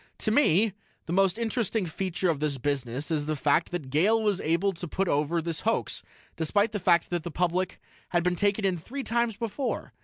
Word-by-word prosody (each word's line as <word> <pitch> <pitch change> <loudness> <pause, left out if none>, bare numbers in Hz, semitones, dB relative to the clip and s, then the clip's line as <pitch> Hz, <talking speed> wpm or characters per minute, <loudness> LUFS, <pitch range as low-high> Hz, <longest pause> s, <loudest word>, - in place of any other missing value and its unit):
"To 215 - -1
me, 215 - +4 0.3
the 165 - -3
most 195 +1 +3
interesting 225 -3 -1
feature 180 +1 -1
of 150 - -4
this 150 -2 -1
business 135 +1 -2
is 150 -2 0
the 155 - 0
fact 150 +3 +2
that 155 -7 -5
Gale 195 +10 +4
was 210 -3 +1
able 170 +5 +1
to 175 0 -7
put 195 +4 -1
over 155 +3 +1
this 165 -2 -2
hoax, 225 +1 -1 0.3
despite 205 +7 +1
the 205 - -2
fact 175 -2 +3
that 175 -1 0
the 170 - -5
public 180 +3 -1 0.3
had 175 -1 +1
been 180 0 +1
taken 205 +2 +1
in 185 -3 +1
three 270 - -6
times 235 -2 0
before. 235 +3 -3
180 Hz, 205 wpm, -27 LUFS, 160-210 Hz, 0.3 s, me